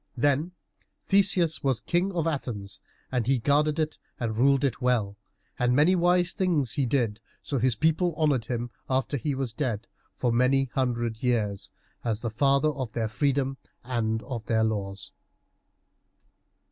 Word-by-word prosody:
Then 145 +7 +1 0.5
Theseus 180 -4 +3
was 135 -4 +1
King 180 +3 0
of 170 -3 -1
Athens, 120 -11 -4 0.3
and 125 -4 0
he 135 0 +3
guarded 145 +5 +2
it 155 -1 -2 0.2
and 115 -2 -2
ruled 135 +4 +3
it 135 -4 0
well, 115 -5 +1 0.4
and 125 0 +2
many 155 +7 +5
wise 175 0 +3
things 155 - +1
he 135 -3 +1
did, 115 -4 0 0.2
so 140 - -2
that 120 - -2
his 130 -3 +3
people 160 - +1
honored 145 -7 +2
him 120 0 -3 0.2
after 130 +2 0
he 140 +1 -1
was 130 -4 -3
dead, 115 -5 -2 0.3
for 125 - 0
many 125 +3 +3
a 130 - -9
hundred 120 -3 -1
years, 105 -6 0 0.3
as 110 -2 -1
the 115 - -3
father 140 +6 +3
of 130 -7 -4
their 115 -2 -1
freedom 135 +2 0 0.3
and 115 -3 -1
of 120 -5 -5
their 110 -1 +2
laws. 100 -3 -3
130 Hz, 160 wpm, -27 LUFS, 115-145 Hz, 0.5 s, many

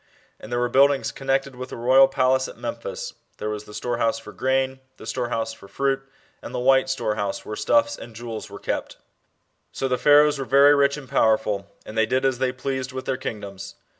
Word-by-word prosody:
And 110 - -11
there 120 - 0
wers 120 0 0
buildings 140 +1 +4
connected 135 0 -1
with 130 +1 -7
the - - -7
royal 130 +3 +6
palace 130 -1 +2
at - - -11
Memphis. - - -5 0.2
there 105 - -3
was 105 0 -5
the 105 - -12
storehouse 120 -2 0
for 115 - -10
grain, 130 0 0 0.2
the - - -11
storehouse 120 -3 -2
for 110 -3 -14
fruit, 135 +4 0 0.4
and - - -8
the - - -1
white 130 +1 +4
storehouse, 105 -6 -2
whe^e 105 - -6
stuffs 290 - +2
and 115 -1 -11
jewels 115 -1 -6
are - - -9
kept. - - -4 0.7
So 135 - -2
the 125 -1 0
Pharaohs 150 0 +5
were 135 - -3
very 140 +2 +6
rich 140 0 +3
and 140 -3 -9
powerful, 110 -6 +1 0.2
and 110 - -9
they 110 0 +2
did 130 +3 +1
as 130 -2 +1
they 130 -1 +1
pleased 130 0 -4
with 130 0 -6
their 135 - 0
king 115 -4 -5
doms. 100 -1 -9
130 Hz, 210 wpm, -24 LUFS, 115-135 Hz, 0.7 s, royal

